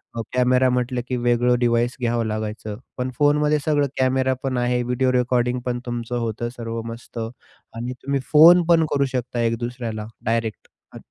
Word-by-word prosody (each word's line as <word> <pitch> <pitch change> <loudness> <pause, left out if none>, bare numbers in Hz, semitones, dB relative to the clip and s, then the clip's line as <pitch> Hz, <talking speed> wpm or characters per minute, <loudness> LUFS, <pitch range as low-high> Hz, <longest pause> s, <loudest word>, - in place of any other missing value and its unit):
अ, 115 - -2
camera 125 +1 +3
म्हटलं 125 0 -1
की 125 - -2
वेगळं 120 0 +2
डिव्हाइस 120 0 +1
घ्यावं 120 -1 0
लागायचं, 110 0 -4 0.2
पण 125 0 -2
फोनमध्ये 150 +1 +3
सगळं 145 -2 +2
कॅमेरा 130 0 +2
पण 130 -2 -1
आहे, 125 0 +1
व्हिडिओ 125 +1 +1
रेकॉर्डिंग 125 0 +1
पण 120 -1 -1
तुमचं 120 0 -3
होतं 115 +1 -3
सर्व 115 -1 -4
मस्त 115 0 -8
आणि 115 +1 -8
तुम्ही 140 0 0
फोन 170 +3 +8
पण 165 -2 +5
करू 140 -1 +2
शकता 125 -1 -2
एक 115 0 +1
दुसऱ्याला, 120 -3 -4 0.2
डायरेक्ट. 115 -1 -2 0.3
अ, - - -9
125 Hz, 170 wpm, -22 LUFS, 115-130 Hz, 0.3 s, फोन